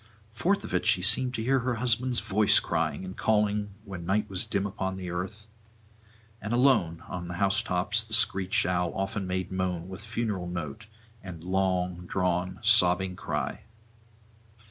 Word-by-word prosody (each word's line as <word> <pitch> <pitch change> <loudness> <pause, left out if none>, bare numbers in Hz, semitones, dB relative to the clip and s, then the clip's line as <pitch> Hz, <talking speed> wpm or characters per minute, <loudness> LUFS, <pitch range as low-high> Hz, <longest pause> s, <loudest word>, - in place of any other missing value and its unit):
Forth 180 - 0
of - - -7
it - - 0
she 90 - +4
seemed 125 +5 +3
to 110 - -2
hear 135 +3 +3
her 125 0 -1
husband's 125 +1 +2
voice 105 -1 +4
crying 80 +1 -2
and 95 0 -7
calling 105 -2 +1
when 95 -4 -7
night 105 +4 0
was 95 -3 -2
dim 100 -1 -1
upon 95 -1 -3
earth, 95 +4 -5 1.0
and 105 +3 -3
alone 105 -11 +3
on 90 -1 -5
the 85 - -5
house 95 +2 +2
tops 95 +5 0
the 110 0 +2
screech 95 -1 +3
owl 90 -1 0
often 95 0 -2
made 95 0 -2
moan 90 -2 -2
with 95 +1 -8
funeral 110 -5 -3
note 85 +3 -6 0.3
and 85 -4 -9
long 90 -1 -1
drawn 90 0 -1
sobbing 95 -4 +4
cry. - - -3
95 Hz, 160 wpm, -28 LUFS, 90-110 Hz, 1.0 s, she